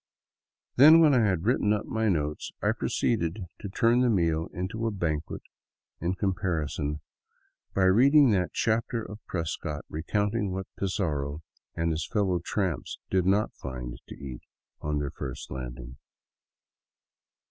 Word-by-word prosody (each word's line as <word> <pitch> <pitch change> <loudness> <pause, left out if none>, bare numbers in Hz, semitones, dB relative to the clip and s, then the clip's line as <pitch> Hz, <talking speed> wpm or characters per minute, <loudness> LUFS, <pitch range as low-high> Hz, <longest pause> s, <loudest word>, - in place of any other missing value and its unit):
Then, 155 +5 +9
when 155 -3 +6
I 125 - +5
had 90 -1 -1
written 105 -3 +2
up 105 - -2
my 110 -1 0
notes, 75 -4 -1
I - - +2
proceeded 95 -3 -1
to 100 - -6
turn 115 +5 +3
the 125 - +3
meal 85 -6 +1
into 110 +6 -3
a - - 0
banquet 80 -6 -3 0.6
in 90 +3 -1
comparison, 80 -6 -1 0.7
by 95 - +3
reading 130 +8 +6
that 90 -6 +1
chapter 115 +1 0
of 105 0 -9
Prescott 80 -3 -3
recounting 105 +5 -1
what 95 +1 -3
Pizarro 80 -6 -2 0.3
and 85 0 0
his 80 0 -2
fellow 100 -5 +1
tramps 95 -9 -2
did 95 -1 +2
not 100 +3 +2
find 60 -2 -7
to - - -9
eat 65 -3 -8 0.4
on 75 0 -1
their 75 -1 -2
first 70 -3 -7
landing. 60 -1 -7
90 Hz, 140 wpm, -28 LUFS, 75-105 Hz, 0.7 s, Then